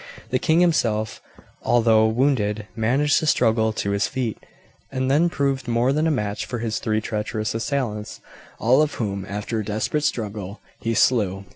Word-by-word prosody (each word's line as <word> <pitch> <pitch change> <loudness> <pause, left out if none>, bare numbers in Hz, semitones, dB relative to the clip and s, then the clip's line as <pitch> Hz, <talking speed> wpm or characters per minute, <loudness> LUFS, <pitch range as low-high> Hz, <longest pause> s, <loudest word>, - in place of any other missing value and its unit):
The 130 - +2
king 160 +6 +3
himself, 110 -11 +1 0.4
although 110 -2 +4
wounded, 110 -3 +1
managed 130 +7 +2
to 155 - -2
struggle 110 -5 +3
to 100 -2 -2
his 100 0 +1
feet, 125 -5 -3 0.5
and 130 0 -1
then 160 +5 +4
proved 140 -5 -1
more 120 +3 +2
than 155 +2 +1
a - - +3
match 105 -8 -1
for 120 - -3
his 115 -1 -2
three 110 -1 0
treacherous 110 0 -3
assailants, 115 -3 -3 0.4
all 125 +6 +4
of 155 - 0
whom, 100 -4 -3
after 105 +3 -3
a - - -2
desperate 110 +8 -1
struggle, 105 -7 -3 0.2
he 115 0 -1
slew. 100 -6 +2
115 Hz, 165 wpm, -23 LUFS, 105-135 Hz, 0.5 s, although